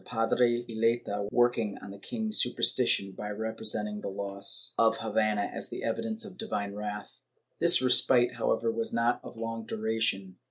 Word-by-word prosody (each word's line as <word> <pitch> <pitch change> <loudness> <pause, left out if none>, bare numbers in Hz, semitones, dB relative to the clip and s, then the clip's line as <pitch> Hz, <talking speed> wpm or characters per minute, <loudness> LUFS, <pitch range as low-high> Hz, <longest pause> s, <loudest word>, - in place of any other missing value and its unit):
Padre 120 +1 +1
Eleta, 110 -3 -1
working 120 -4 +1
on 100 - -10
the 100 - -11
king's 220 - -1
superstition 100 -4 +1
by 105 +2 -7
representing 105 -1 -2
the - - -5
loss 100 +6 +2
of 115 0 +3
Havana 110 -1 0
as - - -6
an - - -6
evidence 220 - -2
of 185 -3 -12
divine 100 - -3
wrath. 105 0 -7 0.3
^ - - -48
This - - +5
respite, 125 -1 +4
however, 115 -1 0
was 115 0 -3
not 115 +1 +1
of - - -11
long 115 0 -4
duration. 110 -4 -2
115 Hz, 160 wpm, -29 LUFS, 105-120 Hz, 0.3 s, This